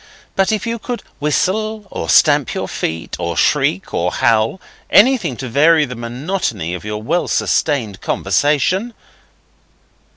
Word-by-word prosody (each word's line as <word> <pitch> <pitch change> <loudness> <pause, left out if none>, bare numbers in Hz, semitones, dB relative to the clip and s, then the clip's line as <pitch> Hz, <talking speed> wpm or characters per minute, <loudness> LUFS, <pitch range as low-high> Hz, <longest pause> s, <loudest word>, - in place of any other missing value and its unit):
But 195 +2 +2
if 215 -1 -1
you 230 0 -3
could 240 +2 -5 0.2
whistle, 210 +8 -1
or 80 - -5
stamp - - +5
with - - -5
your - - -3
feet, 80 +1 -4
or 85 -1 -3
shriek 90 +5 +1
or 90 +1 0
howl 115 +5 +1 0.3
anything 205 - +4
to 130 - -5
vary 150 +5 +4
the 125 - -7
monotony 120 - -3
of 90 - -6
your 105 0 -5
well 170 +9 0
sustained 120 -10 0
conversation. 185 - 0
145 Hz, 140 wpm, -17 LUFS, -, 0.3 s, stamp